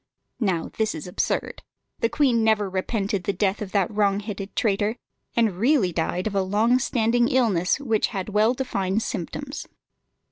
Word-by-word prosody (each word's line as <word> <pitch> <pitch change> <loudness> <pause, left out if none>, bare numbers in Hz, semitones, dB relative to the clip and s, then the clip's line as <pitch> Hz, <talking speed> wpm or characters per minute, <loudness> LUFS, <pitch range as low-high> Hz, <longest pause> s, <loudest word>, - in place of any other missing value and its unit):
Now 185 -8 -1
this 220 -1 +1
is 155 - -6
absurd. 180 - -2 0.4
The 230 - +1
queen 250 -6 +2
never 215 -2 +3
repented 195 0 -2
the 200 - 0
death 195 +2 0
of 200 -3 -5
that 195 -2 +2
wrongheaded 205 -1 -1
traitor, 210 0 +1 0.4
and 220 -6 +1
really 230 - +3
died 175 +2 -1
of 215 - -2
a 195 - +2
long 215 +6 +2
standing 240 -3 +2
disease 210 -9 +2
which 225 -6 +1
had 190 0 -4
well 215 +4 +3
defined 210 -5 -1
symptoms. 270 - -5
210 Hz, 155 wpm, -24 LUFS, 190-230 Hz, 0.4 s, never